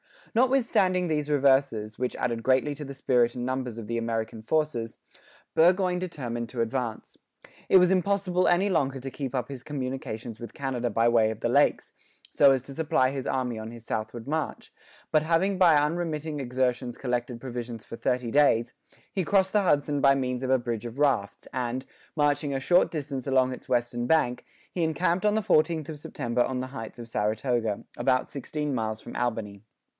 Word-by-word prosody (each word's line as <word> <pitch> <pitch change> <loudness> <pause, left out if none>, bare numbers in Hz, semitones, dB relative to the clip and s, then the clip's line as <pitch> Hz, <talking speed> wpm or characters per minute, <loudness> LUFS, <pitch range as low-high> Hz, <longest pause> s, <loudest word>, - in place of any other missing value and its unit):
Notwithstanding 230 -8 +2
these 150 -2 -1
reverses, 135 -6 +2
which 125 -1 -1
added 115 -2 -2
greatly 130 +4 +2
to 150 +1 -7
the 140 - -7
spirit 125 -3 +2
and 120 -1 -3
numbers 130 -2 -3
of 115 - -6
the 115 +2 -2
American 115 -1 -3
forces, 120 -3 -1 0.6
Burgoyne 180 +2 +3
determined 125 -10 -4
to 120 -2 -3
advance. 115 -1 -3 0.5
It - - +7
was 180 0 +5
impossible 190 -1 +1
any 175 +3 +3
longer 135 -7 0
to 135 +1 -6
keep 135 -2 -5
up 125 0 -2
his 135 -3 -7
communications 130 -5 -5
with 120 -2 -8
Canada 130 -3 -2
by 115 +2 +3
way 115 -2 +4
of 110 - -6
the - - 0
lakes, - - +2 0.4
so 140 -1 +6
as 130 -2 +1
to 140 - -10
supply 135 -4 +1
his 135 -2 -4
army 125 -3 -1
on 110 0 -6
his 115 -1 -11
southward 110 +1 -4
march; 155 +1 -3 0.4
but 155 - +4
having 170 +5 +1
by 170 -4 +6
unremitting 155 0 -1
exertions 125 -1 -1
collected 120 -2 -3
provisions 120 -3 -6
for 115 - -9
thirty 125 -2 -1
days, 125 -4 +3 0.4
he 190 -3 -1
crossed 190 +1 +2
the 210 -1 +3
Hudson 145 -4 +2
by 135 0 +6
means 125 -2 -2
of 130 - -2
a 130 - +5
bridge 120 -2 -4
of 120 +2 -7
rafts, 135 -9 0
and, 130 0 -2 0.3
marching 145 -1 +1
a - - 0
short 175 +7 +4
distance 140 -4 -4
along 130 -1 +3
its 130 - -9
western 120 0 0
bank, 135 -6 +2 0.3
he 175 - -3
encamped 170 +4 +1
on 210 0 +3
the 220 - +2
14th 160 -4 +2
of 155 -2 -6
September 120 -4 -2
on 125 +1 0
the 130 - -4
heights 125 -4 -8
of 120 -1 -9
Saratoga, 110 0 -1
about 130 +1 +1
sixteen 150 +1 -4
miles 110 -2 -2
from - - -10
Albany. 110 -5 -2
130 Hz, 185 wpm, -27 LUFS, 120-155 Hz, 0.6 s, It